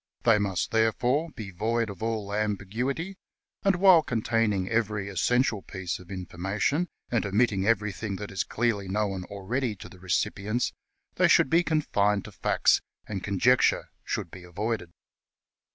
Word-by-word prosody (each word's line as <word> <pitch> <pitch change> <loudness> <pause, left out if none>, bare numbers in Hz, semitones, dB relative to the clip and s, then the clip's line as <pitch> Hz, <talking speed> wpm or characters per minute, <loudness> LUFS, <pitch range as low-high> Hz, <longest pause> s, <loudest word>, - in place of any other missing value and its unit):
They 105 - +5
must, 95 -3 -1
therefore, 120 +8 +2
be 105 -5 -7
void 110 +4 -1
of 100 - -11
all 110 -3 -2
ambiguity, 110 - -2 0.4
and 195 -1 +3
while 180 -2 +7
containing 115 -7 0
every 105 -2 0
essential 110 - +1
piece 95 -3 -5
of 90 - -14
information, 95 - -1 0.2
and 120 -2 +1
omitting 100 -1 +1
everything 105 -2 0
that 105 +1 -6
is 95 - -1
clearly 110 -4 -1
known 95 -2 -1
already 105 +5 -2
to - - -10
the 95 - -15
recipients, 105 +5 -1 0.4
they - - +5
should - - +4
be 165 +1 +5
confined 105 - +1
to - - -9
facts, - - +2 0.2
and 100 -3 -5
conjecture 115 +6 +3
should - - -3
be 90 - -10
avoided. 100 +1 -3
105 Hz, 145 wpm, -27 LUFS, 95-120 Hz, 0.4 s, while